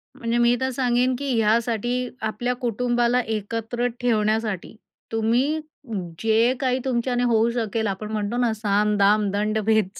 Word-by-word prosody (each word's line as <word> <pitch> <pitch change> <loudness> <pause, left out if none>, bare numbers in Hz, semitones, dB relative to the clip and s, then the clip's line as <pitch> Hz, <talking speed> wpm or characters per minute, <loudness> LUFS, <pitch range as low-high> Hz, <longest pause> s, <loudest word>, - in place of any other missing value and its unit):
म्हणजे 230 +1 -1
मी 240 0 +4
तर 260 - +1
सांगेन 250 0 +1
की 280 - -3
ह्यासाठी, 235 +2 +1
आपल्या 240 +3 -1
कुटुंबाला 240 0 +1
एकत्र 225 +2 -2
ठेवण्यासाठी, 215 -4 0 0.4
तुम्ही 240 +8 +1 0.6
जे 225 +2 +3
काही 255 -1 +1
तुमच्याने 245 -1 0
होऊ 230 -1 +3
शकेल, 225 -2 -1
आपण 210 +2 -4
म्हणतो 215 +2 -2
ना. 240 -2 +2
साम, 210 -1 +1
दाम, 205 +1 +3
दंड, 210 +2 0
भेद. 220 -2 +3
230 Hz, 140 wpm, -23 LUFS, 215-245 Hz, 0.6 s, मी